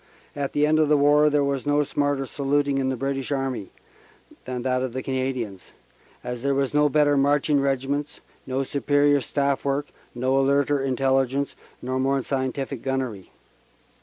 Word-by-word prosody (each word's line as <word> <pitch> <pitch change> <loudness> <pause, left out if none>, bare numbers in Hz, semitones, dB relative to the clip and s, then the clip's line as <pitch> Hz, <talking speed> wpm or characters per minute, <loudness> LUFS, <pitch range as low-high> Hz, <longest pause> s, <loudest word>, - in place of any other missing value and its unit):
At 140 -1 -3
the 145 - +3
end 155 +1 +3
of 155 -2 +3
the 150 - +5
war 145 +1 +5
there 145 -1 +2
was 140 0 -2
no 145 0 +3
smarter 145 -1 -1
saluting 140 +1 0
in 130 -1 0
the 130 - -1
British 135 +2 -3
Army 135 -8 -2 0.8
than 125 -1 -4
that 130 -1 0
of 130 -2 -3
the 130 0 -4
Canadians, 130 -7 -3 0.5
as 125 -1 -5
there 140 +1 +1
were 135 0 +1
no 150 0 +4
better 145 0 +3
marching 145 +1 +2
regiments, 140 +2 -2 0.3
no 130 +1 -1
superior 145 +1 +2
Staff 140 0 -1
work, 140 +1 -1 0.3
no 130 +2 0
alerter 140 +1 +2
Intelligence, 135 +1 0 0.3
nor 130 +1 -2
more 135 0 +1
scientific 135 -1 -3
gunnery. 130 -8 -3
135 Hz, 165 wpm, -24 LUFS, 130-145 Hz, 0.8 s, the